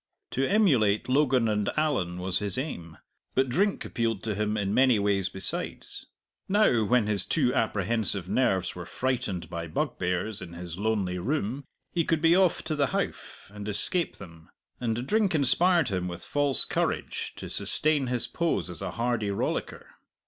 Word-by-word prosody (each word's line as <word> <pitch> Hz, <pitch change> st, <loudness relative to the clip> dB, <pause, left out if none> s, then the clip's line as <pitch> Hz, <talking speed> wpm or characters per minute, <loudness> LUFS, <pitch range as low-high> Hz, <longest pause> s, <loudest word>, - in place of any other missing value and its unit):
To 135 Hz, -, 0 dB
emulate 135 Hz, -, +3 dB
Logan 130 Hz, -3 st, +2 dB
and 105 Hz, -1 st, 0 dB
Allan 95 Hz, -, 0 dB
was 90 Hz, 0 st, -1 dB
his 100 Hz, -2 st, -2 dB
aim. 85 Hz, -, -5 dB, 0.4 s
But 130 Hz, 0 st, +2 dB
drink 195 Hz, +10 st, 0 dB
appealed 115 Hz, -5 st, -2 dB
to 110 Hz, -, -2 dB
him 105 Hz, +1 st, -1 dB
in 100 Hz, -1 st, -1 dB
many 130 Hz, -2 st, +4 dB
ways 100 Hz, -2 st, +1 dB
besides. 95 Hz, -2 st, -3 dB, 0.4 s
Now 190 Hz, -, +3 dB
when 120 Hz, 0 st, +3 dB
his 105 Hz, -3 st, +6 dB
too 130 Hz, -6 st, +1 dB
apprehensive 110 Hz, -3 st, 0 dB
nerves -, -, +1 dB
were -, -, -8 dB
frightened 120 Hz, -10 st, -2 dB
by 85 Hz, 0 st, -5 dB
bugbears 90 Hz, +6 st, -2 dB
in 85 Hz, -2 st, -9 dB
his 85 Hz, -1 st, -7 dB
lonely 100 Hz, -4 st, -1 dB
room 135 Hz, -, -2 dB, 0.3 s
he 170 Hz, -, +1 dB
could 160 Hz, 0 st, +1 dB
be 165 Hz, +2 st, +4 dB
off 185 Hz, -2 st, +2 dB
to 160 Hz, -1 st, -2 dB
the 140 Hz, -2 st, +2 dB
Howff 110 Hz, -, -5 dB
and 105 Hz, 0 st, -7 dB
escape 165 Hz, -, +1 dB
them. 85 Hz, -4 st, -13 dB, 0.3 s
And 120 Hz, 0 st, -2 dB
drink 205 Hz, +1 st, +1 dB
inspired 160 Hz, +2 st, +3 dB
him 90 Hz, -2 st, -2 dB
with 85 Hz, -1 st, -7 dB
false 145 Hz, -2 st, +4 dB
courage -, -, -2 dB
to -, -, -7 dB
sustain 150 Hz, -3 st, 0 dB
his 120 Hz, -1 st, +1 dB
pose 145 Hz, -, -1 dB
as 85 Hz, -, -9 dB
a -, -, -3 dB
hardy 115 Hz, -3 st, -1 dB
rollicker. 100 Hz, -, -3 dB
115 Hz, 165 wpm, -27 LUFS, 95-140 Hz, 0.4 s, his